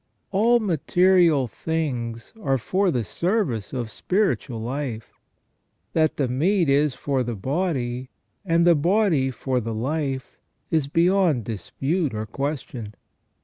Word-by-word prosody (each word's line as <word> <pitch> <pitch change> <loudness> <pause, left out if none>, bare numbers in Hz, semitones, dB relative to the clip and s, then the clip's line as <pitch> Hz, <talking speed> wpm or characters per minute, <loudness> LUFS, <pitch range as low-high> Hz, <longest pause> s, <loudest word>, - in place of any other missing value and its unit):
All 230 +5 +4
material 175 - +3
things 120 -4 -3
are 135 -7 +1
for 190 - +1
the 125 -8 0
service 170 - -1
of 120 -4 -4
spiritual 180 - 0
life. 120 -1 -4 0.8
That 155 -2 +2
the 140 - +1
meat 165 +7 +2
is 140 -1 +3
for 135 -2 -1
the 120 -2 -2
body, 130 - -2 0.3
and 170 -3 +2
the 175 - +7
body 170 -3 +2
for 130 0 -1
the 115 -1 -4
life, 135 +2 -3 0.3
is 155 -4 +2
beyond 170 - +3
dispute 135 - -2
or 110 0 -3
question. 125 -4 -4
140 Hz, 125 wpm, -24 LUFS, 125-175 Hz, 0.8 s, the